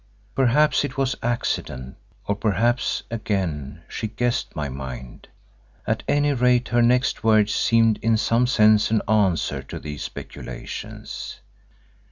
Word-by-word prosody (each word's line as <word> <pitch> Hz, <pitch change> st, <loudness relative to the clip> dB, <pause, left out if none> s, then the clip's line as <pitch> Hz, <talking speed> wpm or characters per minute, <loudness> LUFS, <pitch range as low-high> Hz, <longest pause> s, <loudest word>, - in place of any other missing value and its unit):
Perhaps 135 Hz, +3 st, +3 dB
it 140 Hz, -2 st, -5 dB
was 135 Hz, -1 st, +1 dB
accident, 65 Hz, -, -2 dB, 0.3 s
or 100 Hz, -, +1 dB
perhaps, 110 Hz, +4 st, 0 dB
again, 85 Hz, -, -3 dB
she 110 Hz, -, -4 dB
guessed 120 Hz, +3 st, -2 dB
my 75 Hz, -2 st, -2 dB
mind. 65 Hz, -2 st, -8 dB, 0.6 s
At -, -, 0 dB
any 145 Hz, 0 st, +2 dB
rate 125 Hz, -1 st, +2 dB
her 120 Hz, 0 st, +3 dB
next 125 Hz, +2 st, +2 dB
words 110 Hz, -2 st, +4 dB
seemed 115 Hz, -2 st, +3 dB
in 115 Hz, 0 st, +3 dB
some 115 Hz, +3 st, +2 dB
sense 110 Hz, -3 st, +4 dB
an 110 Hz, -1 st, +1 dB
answer 100 Hz, -6 st, +1 dB
to -, -, -8 dB
these 75 Hz, -2 st, -7 dB
speculations. -, -, -7 dB
110 Hz, 130 wpm, -23 LUFS, 85-125 Hz, 0.6 s, words